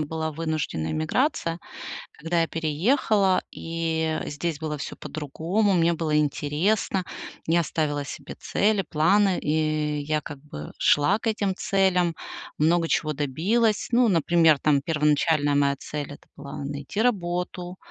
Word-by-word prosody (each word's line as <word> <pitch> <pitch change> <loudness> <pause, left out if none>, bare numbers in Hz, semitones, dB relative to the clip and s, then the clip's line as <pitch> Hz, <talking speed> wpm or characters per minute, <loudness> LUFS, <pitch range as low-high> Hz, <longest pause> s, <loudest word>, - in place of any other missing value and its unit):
была 160 +1 -3
вынужденная 155 - -2
эмиграция, 165 - 0 0.5
когда 165 +2 -1
я 165 - +1
переехала, 190 - +2
и 160 -1 -2
здесь 150 +1 -3
было 155 -2 -3
всё - - -6
по-другому. 160 +8 -1
Мне 170 -1 +3
было 155 -2 -1
интересно, 155 +7 0 0.4
я 170 +1 +3
ставила 145 -3 -1
себе - - -8
цели, 205 -1 +1
планы, 190 +5 +3
и 155 -1 0
я, 155 0 0
как 145 - -8
бы, 135 - -9
шла 165 +9 +3
к 225 - -4
этим 200 -3 0
целям, 180 -4 +2 0.4
много 165 +2 +3
чего 155 -2 0
добилась. 185 - +1
Ну, 240 0 +4
например, 165 -2 +4
там, 145 -2 +3
первоначальная 150 -1 +2
моя 140 -1 +3
цель- 145 -1 -5
это - - -16
была 140 0 -7
найти 145 +8 -3
работу, 180 -4 -1
160 Hz, 135 wpm, -25 LUFS, 150-180 Hz, 0.5 s, Ну